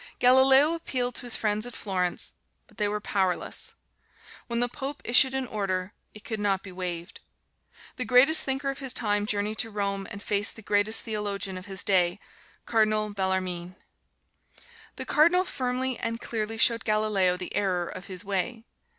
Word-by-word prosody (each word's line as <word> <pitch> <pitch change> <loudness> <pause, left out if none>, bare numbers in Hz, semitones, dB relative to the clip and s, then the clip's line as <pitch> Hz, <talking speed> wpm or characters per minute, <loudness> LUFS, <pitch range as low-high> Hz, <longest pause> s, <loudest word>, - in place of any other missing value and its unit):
Galileo 265 +4 +6
appealed 250 -7 -2
to 245 - -5
his 240 - +4
friends 210 -1 0
at 245 0 -7
Florence, 180 -3 -2 0.3
but - - -24
they 210 - +2
were 210 +1 -1
powerless. 190 -3 -2 0.7
When 235 -1 -1
the 245 - +2
Pope 275 +3 -6
issued 260 +2 +5
an 265 -1 -1
order, 195 -4 -2 0.2
it 210 - -12
could 220 -2 -4
not 200 -2 0
be 190 - -8
waived. 180 -1 -5 0.8
The 255 - -2
greatest 255 +7 +5
thinker 270 +1 -1
of 270 - -9
his 270 -3 -5
time 205 -2 0
journeyed 210 +1 -1
to 225 - +1
Rome 200 -2 -2
and 200 - -8
faced 205 0 0
the 225 - -12
greatest 205 +2 +1
theologian 205 -3 -2
of 185 +2 -8
his 190 -3 -4
day, 180 -1 +2 0.5
Cardinal 215 -2 +2
Bellarmine. 185 -2 -2 1.2
The 260 - -5
Cardinal 340 +7 +4
firmly 255 -5 -2
and 230 0 -2
clearly 225 -1 -3
showed 230 0 +3
Galileo 215 -4 +2
the 180 - -6
error 185 -3 +1
of 185 - -8
his 185 +1 -5
way. 200 +4 -1
210 Hz, 170 wpm, -27 LUFS, 195-245 Hz, 1.2 s, Galileo